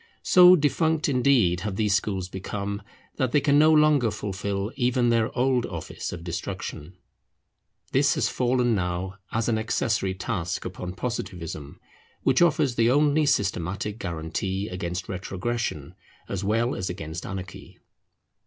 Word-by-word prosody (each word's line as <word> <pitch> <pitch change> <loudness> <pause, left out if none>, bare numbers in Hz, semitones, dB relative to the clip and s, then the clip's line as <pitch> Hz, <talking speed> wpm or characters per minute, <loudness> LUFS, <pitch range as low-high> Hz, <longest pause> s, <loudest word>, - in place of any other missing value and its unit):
So 180 0 +8
defunct, 155 +1 +1
indeed, 125 - +3
have 100 +1 -4
these 105 -1 +1
schools 95 -2 -1
become, 100 +2 -5 0.4
that 130 -2 0
they 145 - +5
can 145 0 +3
no 155 +1 +6
longer 150 -6 +4
fulfil 100 0 -3
even 125 -2 +2
their 115 -1 +2
old 125 -1 +2
office 85 -4 -6
of 85 -1 -7
destruction. 85 0 -6 0.9
This - - +3
has - - +1
fallen 125 -1 +1
now 90 0 -2
as 110 0 -1
an 110 -2 +1
accessory 110 -3 0
task 90 -2 -3
upon 90 0 -6
Positivism, 90 - -5 0.4
which 135 +2 +3
offers 150 -6 +3
the 115 -1 +3
only 145 +2 +3
systematic 100 - -1
guarantee 90 +3 -3
against 90 0 -4
retrogression 95 -3 -3 0.3
as 100 -1 -4
well 115 +5 +1
as 90 - -3
against 80 -1 -6
anarchy. 95 -1 -8
105 Hz, 135 wpm, -25 LUFS, 90-125 Hz, 0.9 s, So